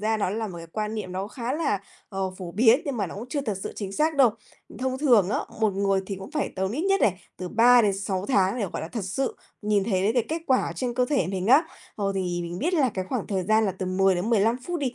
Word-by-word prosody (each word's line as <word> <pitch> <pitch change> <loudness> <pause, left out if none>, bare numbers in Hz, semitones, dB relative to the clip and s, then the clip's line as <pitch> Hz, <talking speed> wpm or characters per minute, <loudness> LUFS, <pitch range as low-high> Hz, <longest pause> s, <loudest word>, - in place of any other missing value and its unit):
ra 220 +1 +1
nó 200 -3 0
là 220 0 -2
một 175 -2 -8
cái 165 - -9
quan 210 +5 -3
niệm 200 -4 -5
nó 190 +2 -3
khá 240 +2 -4
là, 290 - 0 0.3
ờ, 195 -2 -2
phổ 175 -3 -7
biến 235 +6 +5
nhưng 280 -4 -3
mà 200 -3 -1
nó - - -8
cũng 230 +5 -7
chưa 285 - -1
thật 210 -8 -3
sự - - -5
chính 195 -2 -5
xác 310 +6 +1
đâu. 255 -5 +6 0.5
Thông 260 0 -2
thường 235 -10 +4
á, - - +1 0.2
một 220 - +3
người 195 -1 +1
thì 195 - -4
cũng 195 +8 -9
phải 305 -3 -2
tầm 190 0 -1
ít 295 - -2
nhất 390 0 +2
này 190 -2 +2 0.2
từ 180 -1 -5
3-6 205 -5 +3
tháng 200 -2 +2
để, 205 - 0
gọi - - -4
là, 160 - -5
thật 215 -1 -4
sự 260 +8 -2 0.3
nhìn 205 -2 +2
thấy 190 -4 0
được 215 +3 +2
cái 245 -3 +2
kết 325 +1 -3
quả 260 -1 +4
ở - - -3
trên 245 -2 -2
cơ 250 0 +2
thể 275 +1 +1
mình 190 0 -3
á. 275 +8 +6 0.3
Ờ, 200 -2 -1
thì 180 -2 -1
mình 170 +1 -5
biết 350 - 0
là 280 -6 +3
cái 185 -1 -2
khoảng 235 +1 -3
thời 190 -3 -1
gian 220 +3 +3
là 195 - 0
từ 185 - -2
10-15 195 +5 +2
phút 350 -1 -2
đi, 255 -3 -1
210 Hz, 275 wpm, -25 LUFS, 190-250 Hz, 0.5 s, đâu